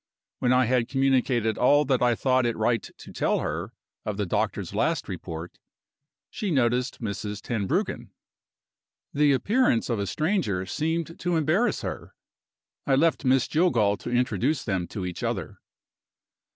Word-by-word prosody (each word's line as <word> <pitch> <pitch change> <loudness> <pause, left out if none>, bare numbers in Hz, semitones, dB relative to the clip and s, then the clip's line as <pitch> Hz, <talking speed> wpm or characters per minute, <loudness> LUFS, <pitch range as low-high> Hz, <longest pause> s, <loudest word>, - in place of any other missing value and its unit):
When 125 - +2
I 125 0 +4
had 120 0 +1
communicated 130 -4 +1
all 145 +4 +4
that 130 -2 +1
I 120 -1 +3
thought 130 0 +2
it 115 - -2
right 110 0 +1 0.2
to - - -12
tell - - +1
her - - -3 0.3
of 105 -2 -3
the 105 - 0
doctor's 85 - -2
last - - 0
report, 80 +1 -7 0.7
she 210 - -3
noticed 125 -5 +1
Mrs. 105 -1 -4
Tenbruggen. 120 - -2 1.0
The 145 0 +4
appearance 165 - +2
of 115 - 0
a 100 - -2
stranger 155 - 0
seemed 160 - -2
to 175 -1 0
embarrass 165 +10 +1
her. - - -6 0.7
I 135 - +4
left 155 0 +2
Miss 130 0 +3
Jillgall 125 - +2
to - - -7
introduce 125 - 0
them 95 -5 -2
to 95 +1 -5
each 90 -2 -5
other. - - -3
125 Hz, 150 wpm, -26 LUFS, 110-150 Hz, 1.0 s, I